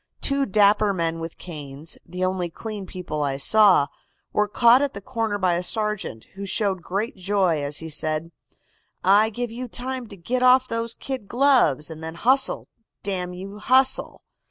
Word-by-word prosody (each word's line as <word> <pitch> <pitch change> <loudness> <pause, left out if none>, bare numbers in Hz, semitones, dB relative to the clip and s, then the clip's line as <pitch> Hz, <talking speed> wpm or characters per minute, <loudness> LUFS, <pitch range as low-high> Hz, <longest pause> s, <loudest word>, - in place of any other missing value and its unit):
Two 275 0 +2
dapper 205 0 +4
men 165 -1 -1
with 165 0 -7
canes, 150 -2 -7
the 180 +2 -3
only 185 -2 -2
clean 205 +2 -7
people 175 -5 -5
I 140 -2 -1
saw, 195 0 +5 0.5
were 210 0 +2
caught 235 +5 +5
at 285 -5 -1
the - - -5
corner 225 -1 -2
by 185 -3 +1
a 170 - 0
sergeant, 210 - -2
who 195 - -8
showed 195 -1 0
great 200 +6 -3
joy 185 -4 +1
as 145 +1 -2
he 160 - -5
said: 155 +2 -1 0.7
"'I 205 +4 +5
give 240 +1 -4
you 250 +2 -6
time 255 +1 -4
to 200 - -11
git 245 +9 -2
off 255 0 +5
those 230 0 -3
kid 260 -7 -6
gloves, 245 - +3
and 160 0 -9
then 160 0 -6
hustle, 260 +8 +2 0.4
damn 180 -2 -3
you, 195 +3 -8
hustle! 260 +4 +2
200 Hz, 175 wpm, -23 LUFS, 170-230 Hz, 0.7 s, saw